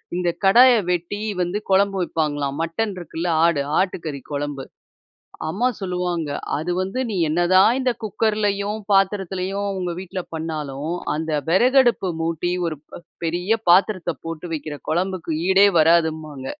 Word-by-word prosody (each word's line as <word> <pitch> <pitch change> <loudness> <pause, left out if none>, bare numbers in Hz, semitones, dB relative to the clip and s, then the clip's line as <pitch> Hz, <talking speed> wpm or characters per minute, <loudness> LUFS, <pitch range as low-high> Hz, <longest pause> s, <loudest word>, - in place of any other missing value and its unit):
இந்த 180 -1 0 0.2
கடாய 245 +6 +7 0.2
வெட்டி 175 +4 -2 0.2
வந்து 180 +3 -1
கொழம்பு 195 0 +3
வைப்பாங்களாம். 145 -4 -2
மட்டன் 195 +6 -2
இருக்குல்ல 170 0 -5 0.2
ஆடு 160 -4 +2 0.2
ஆட்டுக்கறி 160 -7 -2
கொழம்பு. 145 -1 -4 0.8
அம்மா 225 +10 +1
சொல்லுவாங்க, 180 -4 -2 0.3
அது 160 +4 -3
வந்து 195 +7 -2
நீ 215 - -3
என்ன 160 +3 0
தான் 195 +6 +6
இந்த 255 -2 +1
குக்கர்லயும் 210 -1 -1
பாத்திரத்திலயும் 195 0 0
உங்க 180 -1 -2
வீட்ல 185 0 -5
பண்ணாலும், 155 -1 -4 0.2
அந்த 160 +1 -3 0.2
வெறகடுப்பு 240 +1 +4
மூட்டி 165 +2 -1
ஒரு 155 - -3
ப் - - -9 0.3
பெரிய 180 +7 0
பாத்திரத்த 185 -2 +3
போட்டு 165 +1 -6
வைக்கிற 150 -1 -5
கொழம்புக்கு 180 0 -1 0.2
ஈடே 195 +1 +6
வராதும்பாங்க. 155 -4 +2
180 Hz, 130 wpm, -22 LUFS, 160-195 Hz, 0.8 s, கடாய